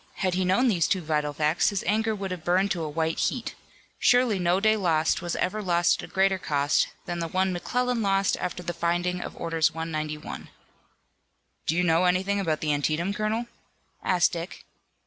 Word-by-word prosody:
Had 185 -2 -1
he 185 +1 +1
known 190 +8 +3
these 180 -8 +2
two 190 - 0
vital 150 -1 0
facts 150 +3 +1
his 200 -3 -2
anger 220 +3 +1
would 195 -2 -5
have 180 -3 -5
burned 185 +3 +2
to 175 - -1
a 155 - -3
white 160 +1 -1
heat. 245 - -1 0.5
Surely 245 -5 +3
no 175 +1 +2
day 215 +1 +3
lost 165 -6 +1
was 175 -1 -3
ever 215 +3 -1
lost 175 -3 +2
at - - -9
a - - -21
greater 190 0 +2
cost 145 -3 +1 0.2
than 175 -1 -4
the 165 - -2
one 185 +2 0
McClellan 245 +6 -1
lost 195 -1 +2
after 180 0 -4
the 175 0 -3
finding 175 +1 -1
of - - -7
Orders 165 -2 +1
No. 160 - -4
191. 155 -2 -5 1.2
"Do 160 - +1
you 180 - +2
know 165 +1 +3
anything 190 +3 +1
about 160 -6 -1
the 150 -1 +1
Antietam, 155 +6 0
colonel?" 215 +3 -1 0.6
asked 180 -2 +2
Dick. 170 +1 -7
180 Hz, 195 wpm, -26 LUFS, 165-195 Hz, 1.2 s, known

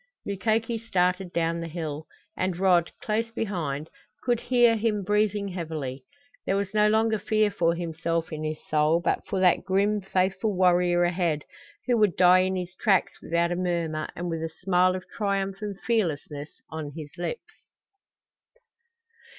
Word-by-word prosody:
Mukoki 220 +3 0
started 180 -4 0
down 170 0 0
the 165 - -4
hill, 155 -2 -5 0.3
and 185 -2 -1
Rod, 180 -2 +3
close 225 +2 0
behind, 170 - -3 0.4
could 240 -2 +1
hear 240 -2 +4
him 215 -2 0
breathing 210 0 +1
heavily; 155 -7 -5 0.4
there 195 - 0
was 200 0 -2
no 210 0 +4
longer 220 0 +2
fear 215 +1 +2
for 170 -2 +1
himself 165 -1 -2
in 155 0 -4
his 155 0 -2
soul, 155 +2 +3
but 175 - 0
for 195 - -1
that 180 -2 +4
grim 200 +2 +1
faithful 190 +2 0
warrior 175 -1 +4
ahead, 175 -4 0 0.4
who 245 -1 +2
would 210 -5 +2
die 180 0 +7
in 185 +1 +1
his 180 -1 -4
tracks 195 -1 +1
without 170 +1 0
a - - 0
murmur 170 -3 -1
and 175 +1 -4
with 165 -1 -3
a 165 - -2
smile 180 +2 +2
of 185 - -5
triumph 195 -2 -1
and 205 -2 -5
fearlessness 155 -9 -1 0.2
on 155 -2 -5
his 150 -2 -7
lips. 175 - -5
180 Hz, 160 wpm, -26 LUFS, 165-205 Hz, 0.4 s, die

